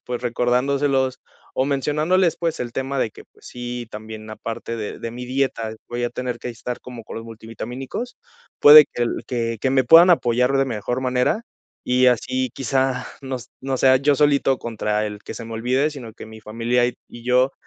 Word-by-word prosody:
pues 125 -1 -4
recordándoselos, 130 +2 +1 0.4
o 130 - +2
mencionándoles, 155 +6 +1
pues 165 -2 -2
el 120 -1 -4
tema 135 +1 -3
de 110 - 0
que, - - -13
pues - - -18
sí, 120 -1 -6
también 110 0 -9
aparte 115 +1 -5
de 105 -2 -5
de 115 - -5
mi 125 +1 -7
dieta 125 -4 -2
voy 120 0 -3
a 120 - 0
tener 125 -1 -4
que 125 - -5
estar 120 +1 -6
como 120 -3 -10
con - - -9
los 115 - -6
multivitamínicos, 120 - -7 0.4
puede 150 0 +10
que 120 - -2
el - - -3
que 115 -2 -2
que 130 - +1
me 130 -1 +3
puedan 170 +7 +8
apoyar 125 -5 +3
de 135 - +3
mejor 120 0 -3
manera, 130 - +1 0.4
y 125 +1 +3
así 130 +1 +1
quizá 130 -1 0 0.2
no 130 -1 -3
s 120 - -10
no 135 0 -2
sea 130 0 +5
yo 140 0 +2
solito 140 -3 +3
contra 105 -2 -2
el 105 -1 -7
que - - -7
se 115 - -7
me 115 - -8
olvide, 130 +6 +1
sino 125 -7 -9
que - - -11
mi 110 0 -12
familia 115 +3 0
y 125 - -3
y 120 - -12
yo 125 +2 +3
125 Hz, 200 wpm, -22 LUFS, 115-135 Hz, 0.4 s, puede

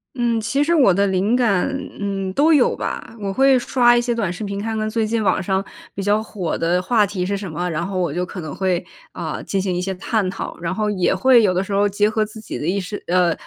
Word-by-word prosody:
嗯， 235 -3 0
其 250 +6 0
实 335 +3 +2
我 255 - +5
的 200 +2 +2
灵 195 +6 +1
感， 220 -6 +2 0.3
嗯， 195 -2 -3
都 300 +9 +4
有 290 -6 +4
吧。 - - -5
我 195 -1 -2
会 270 +4 +4
刷 240 -1 +3
一 240 - +3
些 240 0 -1
短 210 -7 -1
视 195 +4 -6
频， 200 0 -4
看 225 0 -3
看 215 0 -1
最 220 0 0
近 225 0 0
网 - - +2
上 190 +1 0 0.3
比 195 - -3
较 205 +2 +2
火 195 -6 -4
的 175 +2 +1
话 210 +1 +2
题 185 -2 -3
是 200 +1 -1
什 195 -3 -6
么， 175 +3 -3
然 165 +2 -2
后 195 -1 -4
我 175 -5 -1
就 180 +2 -1
可 180 0 -7
能 155 -2 -6
会， 185 -2 0 0.3
啊， - - -4
进 195 -1 -1
行 185 -2 -1
一 180 - -1
些 190 +1 -2
探 195 +1 -1
讨。 - - -6
然 170 +2 -3
后 215 0 0
也 185 -1 +1
会 245 +4 +5
有 185 - +3
的 185 +1 0
时 195 - -8
候 200 +1 +3
结 205 +1 +1
合 220 -1 0
自 215 +1 -11
己 - - -6
的 150 - -3
意 190 - +1
识 200 +2 -5
呃， 175 -1 +3
200 Hz, 285 characters per minute, -20 LUFS, 185-225 Hz, 0.3 s, 我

